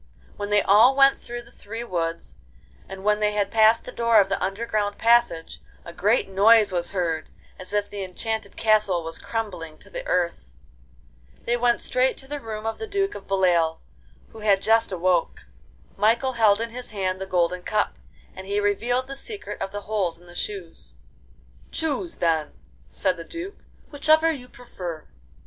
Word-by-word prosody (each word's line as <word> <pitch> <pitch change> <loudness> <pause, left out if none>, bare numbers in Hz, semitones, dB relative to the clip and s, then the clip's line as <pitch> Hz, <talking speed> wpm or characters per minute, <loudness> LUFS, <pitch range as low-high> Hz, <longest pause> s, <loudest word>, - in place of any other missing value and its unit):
Then 205 0 -3
they 205 -1 +4
all 225 +7 +6
went 275 0 +5
through 240 0 -7
the 235 - -19
three 225 0 -7
woods, 170 -6 -3 0.5
and 195 0 -8
when 210 0 +2
they 210 0 +1
had 200 -1 0
passed 220 0 +5
the - - -8
door 230 -2 +4
of 195 -1 +3
the 195 - -1
underground 205 +1 -1
passage 230 -8 +2 0.2
a 170 - -9
great 210 +7 +2
noise 205 +2 +5
was 175 -1 -1
heard, 165 -5 -2 0.3
as 185 - -6
if 205 0 0
the 200 -1 -6
enchanted 220 +3 -4
castle 210 -6 +3
was 165 0 -5
crumbling 180 -9 -5
to - - -16
the - - -5
earth. 65 - -1 0.9
They 240 - +1
went 240 0 +2
straight 255 +1 +1
to 270 - -9
the 290 +1 -5
room 220 -3 -6
of 225 - -3
the 445 - -5
Duke 400 -1 0
of 200 - -10
Beloeil, 175 -4 +2 0.5
who 225 - -13
had 200 -2 +2
just 225 -1 +3
awoke. 180 - 0 0.5
Michael 235 +5 +2
held 220 -3 +4
in 230 0 -3
his 250 +1 -7
hand 190 -2 -2
the 190 - -4
golden 180 -1 +1
cup, 210 +3 -1 0.4
and 190 0 -9
he 200 +1 0
revealed 235 +5 0
the 275 +1 -7
secret 410 +9 -7
of 195 - -3
the 205 0 -5
holes 200 -6 -2
in 175 - -19
the 175 - -14
shoes. 170 - -6 0.7
'Choose, 320 +2 -2
then,' 160 -3 0 0.4
said 185 -2 0
the 165 - -7
Duke, 340 - -7 0.3
'whichever 315 +2 +4
you 250 -5 -7
prefer. 175 -11 -8
205 Hz, 180 wpm, -24 LUFS, 185-235 Hz, 0.9 s, all